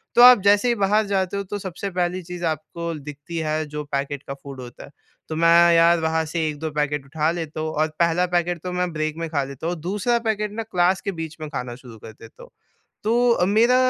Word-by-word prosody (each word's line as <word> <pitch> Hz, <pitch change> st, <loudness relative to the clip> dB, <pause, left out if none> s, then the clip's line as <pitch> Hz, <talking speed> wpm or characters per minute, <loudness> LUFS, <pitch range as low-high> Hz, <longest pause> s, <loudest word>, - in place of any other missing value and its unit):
तो 240 Hz, -, +7 dB
आप 250 Hz, -3 st, +9 dB
जैसे 205 Hz, +4 st, +4 dB
ही 240 Hz, -, +3 dB
बाहर 210 Hz, +1 st, +2 dB
जाते 195 Hz, -1 st, -1 dB
हो 200 Hz, -, -2 dB
तो 205 Hz, +2 st, -5 dB
सबसे 190 Hz, +1 st, -5 dB
पहली 180 Hz, 0 st, -1 dB
चीज़ 175 Hz, 0 st, -7 dB
आपको 165 Hz, +2 st, -3 dB
दिखती 145 Hz, +3 st, -8 dB
है 155 Hz, 0 st, -1 dB
जो 150 Hz, 0 st, -5 dB
पैकेट 140 Hz, 0 st, -2 dB
का 135 Hz, -, -4 dB
फ़ूड 135 Hz, -1 st, -10 dB
होता 120 Hz, -1 st, -10 dB
है। -, -, -16 dB, 0.4 s
तो 155 Hz, -, -3 dB
मैं 165 Hz, +1 st, +3 dB, 0.3 s
यार 170 Hz, 0 st, +5 dB
वहाँ 160 Hz, 0 st, +1 dB
से 160 Hz, 0 st, -1 dB
1-2 150 Hz, +2 st, -4 dB
पैकेट 150 Hz, -1 st, -1 dB
उठा 155 Hz, +2 st, 0 dB
लेता 160 Hz, -2 st, -5 dB
हूँ 155 Hz, 0 st, -2 dB
और 155 Hz, +1 st, +1 dB
पहला 170 Hz, +1 st, +3 dB
पैकेट 175 Hz, -1 st, 0 dB
तो 180 Hz, -, -4 dB
मैं 180 Hz, 0 st, -1 dB
ब्रेक 155 Hz, 0 st, -2 dB
में 165 Hz, 0 st, -3 dB
खा 140 Hz, -3 st, 0 dB
लेता 140 Hz, +4 st, -6 dB
हूँ। 175 Hz, -, -1 dB
दूसरा 210 Hz, +7 st, 0 dB
पैकेट 210 Hz, -1 st, -1 dB
ना 225 Hz, -, -3 dB
क्लास 185 Hz, -3 st, +1 dB
के 200 Hz, -, -2 dB
बीच 165 Hz, -2 st, -6 dB
में 155 Hz, -, -5 dB
खाना 125 Hz, -4 st, -5 dB
शुरू 120 Hz, -3 st, -13 dB
कर 110 Hz, -, -10 dB
देता 115 Hz, +1 st, -15 dB
हूँ। -, -, -14 dB, 0.6 s
तो 235 Hz, -4 st, +3 dB
मेरा 230 Hz, +5 st, +4 dB
165 Hz, 235 wpm, -23 LUFS, 150-195 Hz, 0.6 s, आप